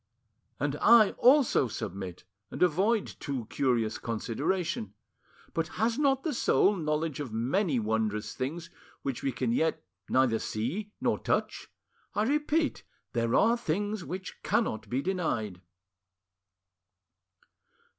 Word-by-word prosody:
'" 110 +2 -45
"And 145 +1 -1
I 220 +1 +6
also 260 - +5
submit, 95 -4 -6 0.3
and - - -1
avoid 195 +6 +2
too 135 -5 -3
curious 120 -5 +1
consideration. 115 - -2 0.6
But 165 -1 0
has 225 +5 +1
not 270 -2 +2
the 320 - -1
soul 210 -3 +3
knowledge 155 -3 -1
of 140 -6 -4
many 135 - +1
wondrous 110 -1 -1
things 160 +6 -4 0.3
which 135 -3 -3
we 135 - 0
can 125 -1 -1
yet 160 +7 +1 0.3
neither 130 -4 +3
see 160 - -3
nor - - +1
touch? - - -1 0.5
I 210 - +2
repeat, 300 +4 +1 0.3
there 115 -1 +1
are 230 +2 +5
things 205 -1 -2
which 185 +2 -7
cannot 110 - 0
be 130 +3 -1
denied." 120 - -2
150 Hz, 125 wpm, -29 LUFS, -, 0.6 s, I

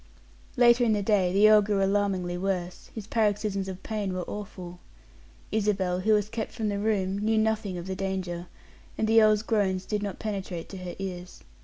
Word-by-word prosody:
Later 240 0 +6
in 225 -2 +3
the 205 -1 0
day 195 -3 +2
the 200 +3 +5
earl 215 0 +7
grew 200 -1 0
alarmingly 195 -3 0
worse; 180 -1 -3
his 220 -3 -6
paroxysms 205 -3 0
of 190 0 -7
pain 205 -4 -3
were 180 - -2
awful. 185 -4 -7 0.7
Isabel, 195 -4 0
who 215 +4 +2
was 210 -1 +2
kept 220 0 -4
from 220 -3 -2
the 200 0 -2
room, 200 -2 0
knew 220 +1 +1
nothing 220 -3 0
of 175 - -6
the 190 0 -4
danger, 185 -2 -3 0.5
and 220 - 0
the 225 +1 +6
earl's 215 -1 +4
groans 195 -5 0
did 210 -1 -2
not 200 -2 -4
penetrate 195 -5 -5
to 195 - -8
her 180 -1 -7
ears. 180 -2 -7
200 Hz, 190 wpm, -27 LUFS, 185-215 Hz, 0.7 s, earl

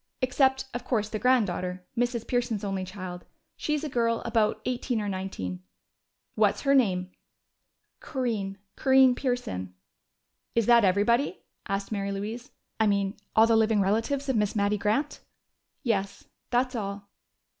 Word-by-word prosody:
Except, 265 +1 +2
of 245 - -4
course, 215 -4 0
the 215 - -3
granddaughter 185 -7 +1
Mrs. 240 -1 0
Pearson's 240 -4 -1
only 195 -2 -2
child. 185 -1 -7 0.3
She's 300 0 -1
a - - -1
girl 230 -4 0
about 225 -2 +1
eighteen 250 -1 -1
or 210 - -2
nineteen." 185 - -4 0.7
"What's 210 -2 +2
her 275 -1 +3
name?" 185 -8 +2 0.9
"Corinne 220 -8 -3 0.2
Corinne 265 -1 +5
Pearson." 245 - -3 0.8
"Is 230 -2 +3
that 235 0 +6
everybody?" 205 +4 +2 0.2
asked 195 +1 -2
Mary 200 -1 -2
Louise. 220 +7 -5 0.3
"I 220 - +4
mean, 200 -1 +1 0.2
all 220 - +7
the 230 0 +3
living 220 -1 +3
relatives 225 +8 0
of 265 - +1
Miss 210 -1 +1
Mattie 205 0 +2
Grant?" 250 +9 0 0.6
"Yes, 200 -4 -1 0.3
that's 250 +1 +1
all." 200 -2 -5
220 Hz, 140 wpm, -27 LUFS, 195-245 Hz, 0.9 s, all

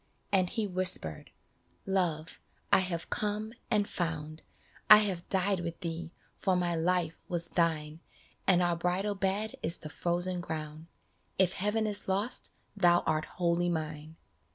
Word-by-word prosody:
And 185 -3 +3
he 225 -3 -1
whispered, 185 - 0 0.3
" 85 +1 -39
Love, 170 -5 -1 0.3
I - - +8
have 180 -3 -3
come 215 +1 -2 0.2
and 210 -3 +2
found! 160 -2 -3 0.5
I 215 - +12
have 190 -5 -1
died 190 0 +1
with 170 -1 -5
thee, 165 -1 -4 0.2
for 190 - +1
my 175 -1 +1
life 170 -1 0
was 170 -1 -2
thine, 160 -2 0 0.5
And 180 -2 +5
our 175 -1 +2
bridal 180 +4 -1
bed 200 +2 -1
is 170 +2 +3
the 155 - -8
frozen 175 +2 +2
ground, 155 -1 -6 0.5
If 190 -1 +3
heaven 210 +3 0
is 210 -1 -1
lost 200 +6 0 0.2
thou 175 -3 +4
art 155 0 0
wholly 175 0 0
mine. 155 -1 -4
175 Hz, 150 wpm, -30 LUFS, 165-195 Hz, 0.5 s, I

